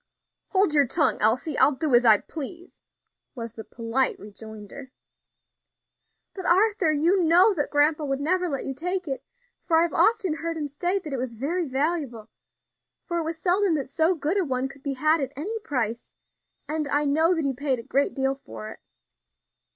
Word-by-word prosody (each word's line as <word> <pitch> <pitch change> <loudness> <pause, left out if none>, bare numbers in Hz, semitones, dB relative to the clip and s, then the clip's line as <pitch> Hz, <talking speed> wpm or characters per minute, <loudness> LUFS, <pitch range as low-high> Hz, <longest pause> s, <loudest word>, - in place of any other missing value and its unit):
"Hold 385 -4 +2
your 285 -3 +4
tongue, 310 +4 +1
Elsie; 250 +8 +2
I'll 290 - +5
do 270 +1 -1
as 240 +1 +5
I 215 -3 +7
please," 340 +4 -9 0.5
was 230 -3 -6
the 220 - -8
polite 235 +4 -1
rejoinder. 220 +5 -11 1.4
"But, 375 -2 -6
Arthur, 390 -2 +3
you 335 +6 +2
know 355 +6 +5
that 290 -6 -2
grandpa 300 +1 +2
would 275 -1 -2
never 360 +4 0
let 275 -3 -3
you 270 - -3
take 360 +5 -3
it. 270 -2 -4 0.5
I 325 0 +5
have 340 - -2
often 395 -8 +2
heard 330 0 -4
him 300 -2 -3
say 350 +7 -1
that 315 -7 -6
it - - -1
was 245 -2 -4
very 320 +8 -2
valuable, 265 -5 -2 0.7
for 345 -1 -2
it - - -1
was 325 0 -4
seldom 365 +1 +2
that 275 -3 -3
so 320 +5 +2
good 325 +5 0
a - - +2
one 260 -3 -2
could 275 +1 -15
be 280 0 -3
had 305 +4 +2
at 270 0 -4
any 420 +11 -4
price; 240 - -3 0.5
and 305 0 -2
I 290 +1 +1
know 320 +5 +3
that 320 -3 -1
he 275 - 0
paid 270 0 -1
a 230 - -8
great 275 +4 0
deal 270 -1 0
for 110 - -10
it." - - -12
295 Hz, 190 wpm, -25 LUFS, 265-340 Hz, 1.4 s, I